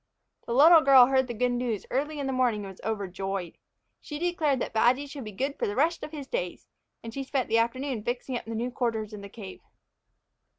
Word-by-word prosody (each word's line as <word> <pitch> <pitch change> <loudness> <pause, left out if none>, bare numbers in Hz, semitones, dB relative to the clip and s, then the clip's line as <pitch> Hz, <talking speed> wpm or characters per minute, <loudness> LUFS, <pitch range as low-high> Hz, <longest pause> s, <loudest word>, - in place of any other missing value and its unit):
The 235 - -2
little 320 +4 +8
girl 265 -3 +8
heard 260 0 +2
the 240 - -4
good 250 +2 +1
news 240 -4 -2
early 295 +4 -1
in 285 - -3
the 270 - -1
morning 245 -5 +1
and 195 - -7
was 190 - -16
overjoyed. 195 -4 -4 0.4
She 295 - -6
declared 315 -5 0
that - - -4
Badgy 245 +5 +3
should 280 -1 -8
be 215 - -7
good 270 +8 -3
for - - 0
the 205 - -3
rest 325 +5 +1
of - - -7
his 295 -3 -7
days, 180 -8 -4 0.4
and 230 -1 -7
she 275 - -4
spent 265 -2 -2
the 225 +1 +3
afternoon 245 0 -1
fixing 245 +2 -3
up - - -4
the 225 0 -5
new 240 +3 -2
quarters 225 -4 -2
in 210 - -7
the 200 - -9
cave. 200 -3 -10
245 Hz, 225 wpm, -27 LUFS, 220-275 Hz, 0.4 s, little